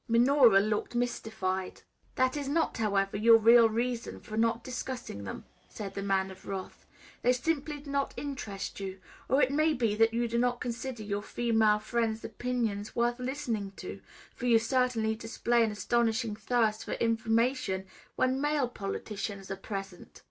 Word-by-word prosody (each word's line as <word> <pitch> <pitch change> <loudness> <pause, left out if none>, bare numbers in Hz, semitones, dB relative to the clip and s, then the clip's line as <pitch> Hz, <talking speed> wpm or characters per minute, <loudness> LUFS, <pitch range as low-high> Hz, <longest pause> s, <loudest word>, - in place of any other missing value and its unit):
Minora 240 -2 +6
looked 210 +3 -2
mystified. 220 -6 -2 0.3
"That 260 +1 +2
is 285 -2 -3
not, 325 +3 +1
however, 200 -2 +1
your 225 +2 +7
real 230 +1 +7
reason 235 +1 -2
for 215 - -8
not 230 +1 +1
discussing 250 - -5
them," - - -7 0.2
said 200 -2 -7
the 200 - -4
Man 190 -1 0
of 190 - -14
Wrath; 195 -1 -6 0.3
"they 250 - +4
simply 295 +2 -2
do 285 -1 -9
not 280 0 -1
interest 220 -11 -5
you. 190 -1 -5 0.3
Or 270 +3 +4
it 260 - +2
may 310 +2 +2
be, 230 -4 +1
that 225 +1 +4
you 235 +1 0
do 235 +1 0
not 245 0 +1
consider 245 -1 -4
your 205 0 -2
female 220 -1 +2
friends' 225 0 -1
opinions 225 -5 -2
worth 240 +1 +1
listening 245 -7 -3
to, - - -7 0.3
for 245 - -4
you 235 -2 +6
certainly 230 -1 +1
display 230 +1 +1
an 225 - +1
astonishing 225 +1 0
thirst 220 0 +1
for - - -4
information 230 -3 +1 0.3
when 255 +1 +1
male 295 -3 +1
politicians 200 -2 -5
are - - -1
present. 195 -2 -7
230 Hz, 165 wpm, -30 LUFS, 210-250 Hz, 0.3 s, your